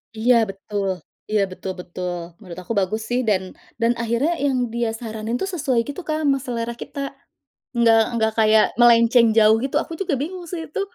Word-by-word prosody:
Iya 240 Hz, +3 st, +3 dB
betul 195 Hz, 0 st, -4 dB, 0.4 s
iya 210 Hz, -2 st, +3 dB
betul 190 Hz, +1 st, -5 dB
betul 180 Hz, 0 st, -5 dB, 0.2 s
menurut 185 Hz, -4 st, -9 dB
aku 205 Hz, -, -7 dB
bagus 215 Hz, +4 st, -1 dB
sih 245 Hz, -, +2 dB
dan 190 Hz, -3 st, 0 dB, 0.3 s
dan 230 Hz, +1 st, +4 dB
akhirnya 235 Hz, +9 st, 0 dB
yang 255 Hz, -4 st, 0 dB
dia 235 Hz, -1 st, -1 dB
saranin 225 Hz, 0 st, -4 dB
tuh 385 Hz, -, -1 dB
sesuai 255 Hz, -7 st, +1 dB
gitu 285 Hz, +6 st, -7 dB
Kak, 310 Hz, 0 st, -1 dB
ama 275 Hz, -2 st, +2 dB
selera 235 Hz, -3 st, -3 dB
kita, 280 Hz, +4 st, -8 dB, 0.8 s
nggak 225 Hz, -1 st, +5 dB, 0.2 s
nggak 220 Hz, 0 st, +1 dB
kayak 215 Hz, 0 st, +5 dB, 0.2 s
melenceng 235 Hz, 0 st, +6 dB
jauh 220 Hz, 0 st, +5 dB
gitu, 270 Hz, -, -2 dB
aku 330 Hz, -, -4 dB
juga 350 Hz, -5 st, -2 dB
bingung 350 Hz, +6 st, -4 dB
sih 330 Hz, -3 st, -5 dB
itu. 315 Hz, -, -4 dB
230 Hz, 180 wpm, -22 LUFS, 215-270 Hz, 0.8 s, melenceng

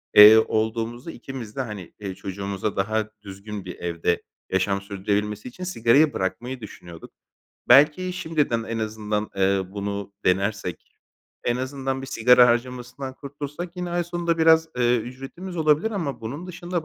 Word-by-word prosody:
eee, 105 Hz, +1 st, +11 dB
olduğumuzda 115 Hz, +6 st, -2 dB
ikimiz 120 Hz, -4 st, -8 dB
de, 135 Hz, -, -1 dB
hani, 105 Hz, -7 st, -7 dB
eee, 100 Hz, -2 st, -5 dB
çocuğumuza 100 Hz, +1 st, -4 dB
daha 110 Hz, +2 st, 0 dB
düzgün 100 Hz, 0 st, -8 dB
bir 90 Hz, -, -6 dB
evde 85 Hz, 0 st, -1 dB, 0.3 s
yaşam 100 Hz, +1 st, +1 dB
sürdürebilmesi 105 Hz, +2 st, -2 dB
için 155 Hz, +9 st, -8 dB
sigarayı 145 Hz, -2 st, +3 dB
bırakmayı 120 Hz, +7 st, -3 dB
düşünüyorduk. 85 Hz, -5 st, -11 dB, 0.6 s
Belki 150 Hz, +8 st, +6 dB
şimdiden 150 Hz, -9 st, 0 dB
en 115 Hz, 0 st, -4 dB
azından, 105 Hz, -1 st, -2 dB
eee, 95 Hz, 0 st, +2 dB
bunu 100 Hz, 0 st, -4 dB
denersek, 100 Hz, -1 st, -1 dB, 0.5 s
en 120 Hz, -, +1 dB
azından 135 Hz, +1 st, -3 dB
bir -, -, -6 dB
sigara 125 Hz, -1 st, +6 dB
harcamasından 125 Hz, +2 st, -2 dB
kurtulsak 145 Hz, +6 st, -7 dB
yine 180 Hz, -1 st, -3 dB
ay 175 Hz, 0 st, 0 dB
sonunda 170 Hz, -1 st, -1 dB
biraz, 160 Hz, 0 st, +5 dB
eee, 120 Hz, 0 st, +3 dB
ücretimiz 135 Hz, +10 st, -7 dB
olabilir 155 Hz, +6 st, +3 dB
ama 170 Hz, -10 st, -3 dB
bunun 140 Hz, +11 st, -6 dB
dışında 175 Hz, -1 st, -4 dB
120 Hz, 145 wpm, -24 LUFS, 100-145 Hz, 0.6 s, eee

